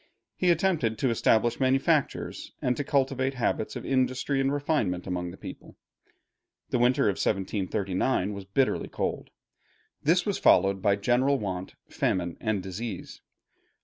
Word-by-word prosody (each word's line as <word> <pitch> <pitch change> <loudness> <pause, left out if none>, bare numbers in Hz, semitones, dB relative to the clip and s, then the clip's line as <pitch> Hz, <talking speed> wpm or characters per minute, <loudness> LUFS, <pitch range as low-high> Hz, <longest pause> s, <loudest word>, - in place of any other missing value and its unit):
He 180 - +1
attempted 165 - +2
to 130 +2 +1
establish 115 +1 +2
manufactures, 135 +3 0
and 125 - 0
to 145 - -2
cultivate 135 -1 0
habits 120 -3 -1
of - - -6
industry 130 +1 +1
and 135 0 +1
refinement 140 - 0
among 90 -1 -3
the 90 - -10
people. - - -10 1.0
The 125 - +1
winter 125 +1 +3
of 100 -2 +1
1739 100 +1 0
was 100 -1 -7
bitterly 130 +7 0
cold. - - -3 0.7
This 175 +4 +3
was 205 - -1
followed 95 +1 +4
by 100 -1 +3
general 125 +7 +2
want, 95 -5 -5
famine, 85 -2 -1
and 110 -4 -1
disease. 95 +1 -6
120 Hz, 140 wpm, -27 LUFS, 95-135 Hz, 1.0 s, followed